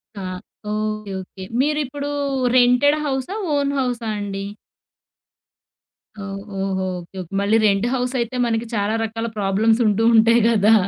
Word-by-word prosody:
క - - -14 0.5
okay. 215 -1 -3
Okay. 190 +1 -11 0.2
మీరిప్పుడు 290 0 -1 0.5
rented 250 +4 +5
హౌసా, 270 +6 -2 0.2
own 280 -1 +1
హౌసా 245 -3 -2
అండి? 195 -1 -4 1.7
ఓహ్! 195 0 -5 0.2
ఓహో! 190 -1 -1 0.2
ఓకే. 175 +2 -17
ఓకే. 180 +1 -11
మళ్ళీ 205 +3 +3
రెంట్ 200 +1 +3
హౌస్ 250 0 -1
అయితే, 235 +2 -2
మనకి 230 0 -1
చాలా 205 +1 0
రకాల 225 +1 -3
ప్రాబ్లమ్స్ 215 +4 +2
ఉంటూ 210 +2 +2
ఉంటాయి 230 +1 +5
గదా! 220 -1 +4
225 Hz, 130 wpm, -21 LUFS, 200-250 Hz, 1.7 s, rented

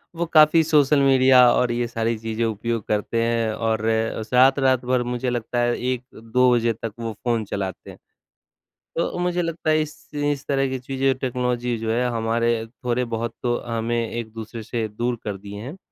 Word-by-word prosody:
वो 170 +1 -1
काफ़ी 160 0 +6
social 150 -2 +4
media 130 -2 +6
और 125 -1 +2
ये 120 0 -1
सारी 115 0 -1
चीजें 110 +1 -3
उपयोग 115 0 -2
करते 105 +2 0
हैं 115 -1 0
और 110 0 -1 0.5
रात-रात 130 0 +4
भर 125 0 +1
मुझे 125 +1 -2
लगता 120 0 -2
है 120 0 +2
1-2 125 -1 0
बजे 115 -1 +2
तक 115 -1 -6
वो 115 -1 -3
फ़ोन 115 -2 0
चलाते 95 -2 -5
हैं। - - -11 1.0
तो 170 - -1
मुझे 175 0 0
लगता 165 -1 -2
है 155 0 +3
इस 155 0 -10
इस 145 -2 -1
तरह 135 -1 +1
की 130 0 -3
चीज़ें 135 +1 0
टेक्नोलॉजी 125 -2 -1
जो 110 0 -3
है 125 +2 +1
हमारे 115 0 0 0.2
थोड़े-बहुत 120 -2 -1
तो 120 -1 +1
हमें 115 0 -1
एक-दूसरे 115 0 -6
से 115 0 -3
दूर 120 +3 -2
कर 105 -2 -3
दिए 100 +1 -9
हैं, 140 +9 -7
120 Hz, 175 wpm, -23 LUFS, 115-130 Hz, 1.0 s, काफ़ी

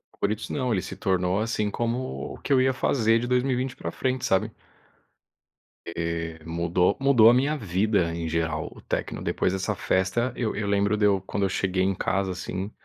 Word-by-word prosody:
favoritos 105 +2 -2
não, 125 -4 -1
ele 95 - +1
se - - -7
tornou 90 0 +1
assim 110 -2 -1
como 120 +4 -3
o - - -11
que - - -8
eu 130 - +5
ia 130 +1 +3
fazer 115 -3 +2
de 120 - -3
2020 125 +1 0
pra - - -5
frente, 130 -1 -1
sabe. 95 - +1 1.4
Eh, 85 -1 -3
mudou 85 +3 +1
mudou 130 -5 +6
a - - +6
minha 140 +5 +2
vida 95 - +1
em 85 -1 -3
geral, 80 0 -1
o - - -14
techno. - - -3
Depois - - 0
dessa 95 0 -2
festa, 95 +7 0
eu 115 -3 -2
eu 105 - -2
lembro 100 +1 +2
de 105 -1 +2
eu, 100 -2 +3
quando 100 +1 -3
eu 95 - +2
cheguei 95 -1 0
em 95 +1 +2
casa, 95 +1 -1
assim, 95 +2 -5
100 Hz, 190 wpm, -26 LUFS, 90-120 Hz, 1.4 s, mudou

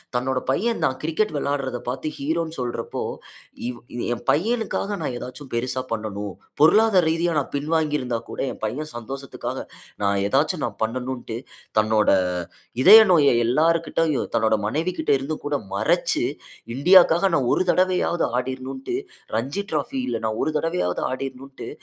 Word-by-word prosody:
தன்னோட 130 +1 0
பையன் 225 - +1
நான் 130 - +1
கிரிக்கெட் 165 +7 0
விளையாட்றத 140 -3 -1
பாத்து, 130 +4 -3
ஹீரோன்னு 160 +3 -2
சொல்றப்போ, 120 -2 -4 0.7
இவ் 125 -1 -5 0.3
என் 120 - -6
பையனுக்காக 210 +2 0
நான் 145 - -2
ஏதாச்சும் 125 +3 -8
பெருசா 130 +2 -1
பண்ணனும். 105 -3 -4 0.2
பொருளாதார 195 +4 +5
ரீதியா 165 +2 +1
நான் 140 - -4
பின்வாங்கி 155 +1 0
இருந்தா 125 -2 -2
கூட, - - -7
என் - - -11
பையன் 145 +8 -3
சந்தோசத்துக்காக, 135 +4 -6 0.4
நான் 100 0 +2
ஏதாச்சும் 145 - +1
நான் 115 -4 -5
பண்ணனுன்ட்டு, 125 0 -3 0.4
தன்னோட 110 0 +2 0.8
இதய 220 +9 +11
நோய 145 -5 +5
எல்லார்கிட்டேயும் 160 +2 +1
தன்னோட 110 0 +3
மனைவிககிட்ட 160 +6 -1
இருந்து 140 +4 -4
கூடமறச்சு, 105 -9 0 0.5
இந்தியாக்காக 175 +4 +6
நான் 130 -5 +1
ஒரு - - +2
தடவையாவது 185 -2 +2
ஆடிரணுன்டு 130 - -4 0.4
ரஞ்சி 135 - -2
டிராஎபில 265 -2 -2
நான் 110 0 -2
ஒரு 155 - 0
தடவையாவது 165 - -1
ஆடிரணுன்டு, 135 +1 -6
135 Hz, 130 wpm, -23 LUFS, 125-165 Hz, 0.8 s, இதய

